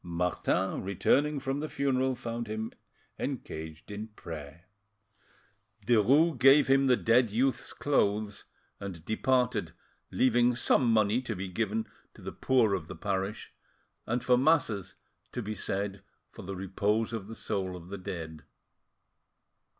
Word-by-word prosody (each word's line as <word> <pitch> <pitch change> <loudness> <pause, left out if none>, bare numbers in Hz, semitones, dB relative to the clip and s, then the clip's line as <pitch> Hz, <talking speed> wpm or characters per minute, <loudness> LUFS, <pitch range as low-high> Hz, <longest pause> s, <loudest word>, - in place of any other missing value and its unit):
Martin, 90 +2 -1
returning 140 +10 +1
from 135 +1 -2
the 155 +1 -4
funeral, 130 -1 +1
found 115 -1 -5
him 110 +1 -4 0.5
engaged 80 +4 -5
in 105 +2 -5
prayer. 80 -5 -9 1.2
Derues 130 - +4
gave 135 +3 +7
him 135 0 +4
the 125 -1 +5
dead 115 0 +3
youth's 125 +6 0
clothes 105 -7 0 0.3
and 90 -5 -7
departed, 110 -5 +1 0.4
leaving 120 -1 +3
some 120 0 +3
money 110 +2 +3
to 120 -4 -4
be 95 +1 -4
given 110 +3 -1 0.3
to - - -14
the - - -5
poor 120 -6 +2
of 90 -5 -2
the - - -7
parish, 100 +1 -3 0.5
and 120 +1 -1
for 125 -1 +4
masses 130 - +2 0.4
to 125 - -4
be 105 +1 -3
said 100 -1 -3 0.3
for - - -10
the 95 +1 -6
repose 105 +4 0
of 105 -4 -4
the 115 - -8
soul 95 -4 -2
of 90 0 -11
the 100 - -5
dead. 80 -5 -6
110 Hz, 140 wpm, -30 LUFS, 95-125 Hz, 1.2 s, gave